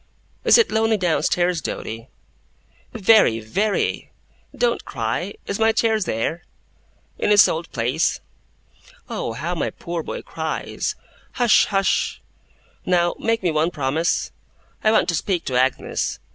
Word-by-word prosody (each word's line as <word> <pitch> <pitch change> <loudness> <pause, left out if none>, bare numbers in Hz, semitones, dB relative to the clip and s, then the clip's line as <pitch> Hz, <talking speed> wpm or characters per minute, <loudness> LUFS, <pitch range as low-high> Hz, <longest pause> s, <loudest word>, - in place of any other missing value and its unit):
Is - - +7
it 465 - +3
lonely, 220 0 +2
down 175 -6 +1
stairs, 175 0 +1
Doady?' 115 -2 -5 0.8
'Very! 215 - +4
Very!' 195 - -1 0.4
'Don't 485 - 0
cry! - - -3
Is 200 - -3
my 225 0 +4
chair 220 0 +1
there?' 165 - -2 0.8
'In - - 0
its 205 -1 +7
old 165 +1 -3
place.' 125 +6 0 0.9
'Oh, 115 - -3
how 155 +9 -3
my 175 - -1
poor 170 -1 -5
boy - - -6
cries! - - -4 0.4
Hush, 240 -3 +4
hush! 195 -1 0 0.6
Now, 175 -1 +2
make 230 -2 0
me 175 - +2
one 155 +2 +1
promise. 155 +2 -1 0.5
I 215 - +4
want 220 - +3
to - - +1
speak 175 +1 -1
to 130 - -2
Agnes. 130 +1 0
175 Hz, 135 wpm, -22 LUFS, 155-215 Hz, 0.9 s, Is